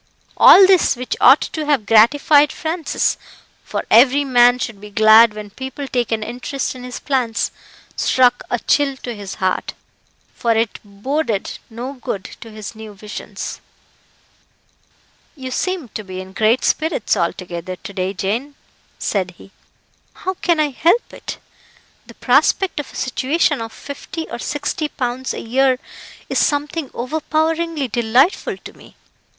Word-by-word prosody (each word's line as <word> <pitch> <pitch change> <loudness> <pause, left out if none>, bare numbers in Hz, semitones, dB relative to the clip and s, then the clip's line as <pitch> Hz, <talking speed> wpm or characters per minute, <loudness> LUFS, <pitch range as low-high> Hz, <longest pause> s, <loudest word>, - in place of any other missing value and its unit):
All 390 - +9
this, 375 -2 +4
which 250 0 -4
ought 270 +4 +7
to 310 -2 -4
have 280 -8 +1
gratified 285 +7 +5
Francis 320 -1 -2 0.4
for - - -4
every 260 +5 +6
man 245 -1 +5
should 230 -5 -5
be 210 - -10
glad 220 +1 +6
when 210 -1 -8
people 265 +4 -6
take 245 -3 -1
an 220 -1 0
interest 250 +4 -4
in 255 -1 -10
his 250 -1 -7
plans 250 -5 -1 0.4
struck 250 -1 +3
a 245 - 0
chill 275 +2 +1
to 245 -2 -6
his 200 -3 -7
heart, 185 -1 -2 0.6
for 230 -1 0
it 225 0 -1
boded 215 +2 -3
no 240 +4 -6
good 215 -7 -5 0.2
to 230 - -10
his 215 0 -8
new 220 -2 -10
visions. 210 +1 -7 1.7
"You 260 -3 -7
seem 370 0 -2
to 215 - -6
be 185 -1 -7
in 190 0 -9
great 220 +5 +2
spirits 315 -10 0
altogether, 175 0 -3
to 200 - -10
day, 185 0 -2
Jane," 225 +9 -3 0.4
said 185 -3 -2
he. 195 - -16 0.6
"How 375 - -3
can 345 -3 0
I 300 -2 +1
help 345 - +1
it? - - -7 0.7
The - - -13
prospect 380 -5 +2
of 290 - -6
a - - -15
situation 280 +2 0
of 225 0 -6
fifty 290 +5 -7
or - - -5
sixty 290 +3 -2
pounds 255 -1 -3
a - - -5
year 260 +2 +2 0.5
is - - 0
something 290 0 0
overpoweringly 315 +3 -1
delightful 240 - +1
to - - -12
me. - - -18
250 Hz, 150 wpm, -19 LUFS, 215-290 Hz, 1.7 s, All